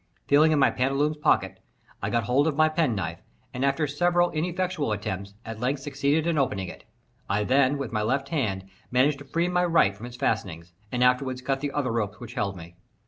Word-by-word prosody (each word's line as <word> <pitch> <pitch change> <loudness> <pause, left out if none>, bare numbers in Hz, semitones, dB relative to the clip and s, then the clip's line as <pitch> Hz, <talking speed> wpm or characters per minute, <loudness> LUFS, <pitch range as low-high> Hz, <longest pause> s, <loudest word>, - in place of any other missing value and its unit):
Feeling 150 +3 +5
in 155 - +3
my 135 - +4
pantaloons' 135 +4 0
pocket, 95 -11 +1 0.4
I - - -1
got 120 -1 +1
hold 130 +8 +2
of 155 - 0
my 155 +1 +4
penknife, 110 - -1 0.3
and, 125 - -3
after 140 +3 +2
several 175 +4 +2
ineffectual 175 -3 -1
attempts, 100 -1 -5
at 115 -1 -6
length 130 +3 -1
succeeded 145 +2 0
in 170 -3 +1
opening 95 -9 -1
it. - - -12 0.4
I 100 +1 +1
then, 135 +4 +3
with 140 -4 -4
my 105 - 0
left 135 +5 -1
hand, 105 - -1 0.3
managed 135 +3 +2
to 145 - -11
free 170 +4 0
my 180 0 +1
right 165 - +3
from 110 +4 -8
its 120 0 -10
fastenings, 90 -8 -2 0.2
and 125 0 +1
afterward 125 0 +1
cut 135 -1 0
the 145 0 -3
other 140 -4 -1
ropes 105 -3 -2
which 120 -1 -9
held 100 -6 -2
me. 85 0 -11
135 Hz, 205 wpm, -26 LUFS, 110-150 Hz, 0.4 s, Feeling